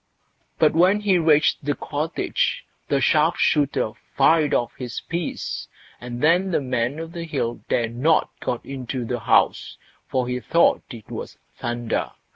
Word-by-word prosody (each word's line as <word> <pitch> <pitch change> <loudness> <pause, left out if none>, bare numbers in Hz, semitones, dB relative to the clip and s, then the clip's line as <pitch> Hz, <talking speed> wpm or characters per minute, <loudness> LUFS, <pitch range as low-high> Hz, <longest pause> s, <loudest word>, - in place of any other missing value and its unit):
But 155 - +4
when 185 +6 +4
he 195 -4 +3
reached 155 -3 +3
the 145 0 0
cottage, 155 +3 -2 0.2
the 140 - +1
sharp 155 +5 +3
shooter 140 -7 +1 0.3
fired 150 +2 +4
off 120 - 0
his 125 -3 -5
piece, 170 0 -4 0.3
and 120 +1 -6
then 175 +5 +4
the 175 - +1
Man 125 +1 -1
o' 165 - -4
the 170 +1 -7
Hill 135 -7 -2
dared 115 -1 0
not 155 +6 +2
go 120 - -2
into 130 -2 -5
the 120 +1 -2
house, - - +2 0.3
for 130 -2 -1
he 125 0 -2
thought 165 +6 +3
it 115 -4 -11
was - - -7 0.2
thunder. 120 -1 -2
140 Hz, 155 wpm, -23 LUFS, 120-165 Hz, 0.3 s, But